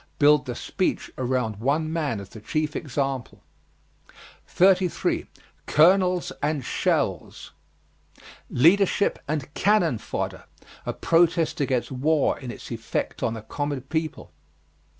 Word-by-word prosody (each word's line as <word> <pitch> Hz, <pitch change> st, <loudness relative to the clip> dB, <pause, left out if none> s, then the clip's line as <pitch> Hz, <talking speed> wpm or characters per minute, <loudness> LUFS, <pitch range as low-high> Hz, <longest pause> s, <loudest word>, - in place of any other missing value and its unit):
Build 150 Hz, -1 st, +4 dB
the 125 Hz, -, -3 dB
speech 185 Hz, -, -2 dB
around 125 Hz, -4 st, -1 dB
one 150 Hz, +7 st, 0 dB
man 150 Hz, -10 st, -1 dB
as 100 Hz, 0 st, -9 dB
the 110 Hz, -, -11 dB
chief 155 Hz, +6 st, -2 dB
example. 135 Hz, -3 st, -3 dB, 1.0 s
33. 185 Hz, -1 st, +2 dB, 0.4 s
COLONELS 180 Hz, +2 st, +4 dB
AND 145 Hz, -3 st, -1 dB
SHELLS. -, -, -1 dB, 1.0 s
Leadership 195 Hz, +8 st, +3 dB
and 150 Hz, -1 st, -3 dB
"cannon 180 Hz, -, +2 dB
fodder" -, -, -4 dB, 0.4 s
a -, -, -1 dB
protest 165 Hz, -2 st, +2 dB
against 125 Hz, -3 st, 0 dB
war 145 Hz, +3 st, +1 dB
in 130 Hz, -3 st, -7 dB
its 120 Hz, -, -9 dB
effect 115 Hz, -1 st, -3 dB
on 115 Hz, -, 0 dB
the 110 Hz, -, -8 dB
common 145 Hz, +3 st, -3 dB
people. 155 Hz, +4 st, -4 dB
145 Hz, 115 wpm, -25 LUFS, 125-165 Hz, 1.0 s, Build